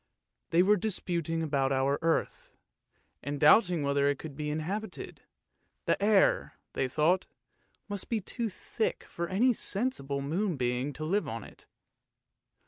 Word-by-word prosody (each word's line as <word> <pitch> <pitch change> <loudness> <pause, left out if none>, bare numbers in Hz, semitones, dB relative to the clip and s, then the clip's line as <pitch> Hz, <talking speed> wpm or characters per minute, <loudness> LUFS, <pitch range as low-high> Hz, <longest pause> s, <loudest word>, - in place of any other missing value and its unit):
They 175 +1 +4
were 210 +2 +4
disputing 170 -5 -2
about 140 -3 +1
our 135 +1 +1
earth, 165 0 -1 0.7
and 145 +1 -4
doubting 175 0 +5
whether 140 0 +2
it 145 - 0
could 150 -2 -8
be 150 +1 -3
inhabited; 185 +9 -4 0.6
the - - +1
air, 205 -2 +3 0.2
they 130 - 0
thought, 155 +7 +2 0.6
must 205 -2 -4
be 230 - +1
too 230 +3 -3
thick 220 +3 -3
for 170 0 -5
any 230 +8 +3
sensible 195 - -2
moon 170 +4 -1
being 125 +2 -1
to 155 +3 -5
live 200 +6 0
in 115 -1 -5
it. - - -15
165 Hz, 140 wpm, -30 LUFS, 140-200 Hz, 0.7 s, doubting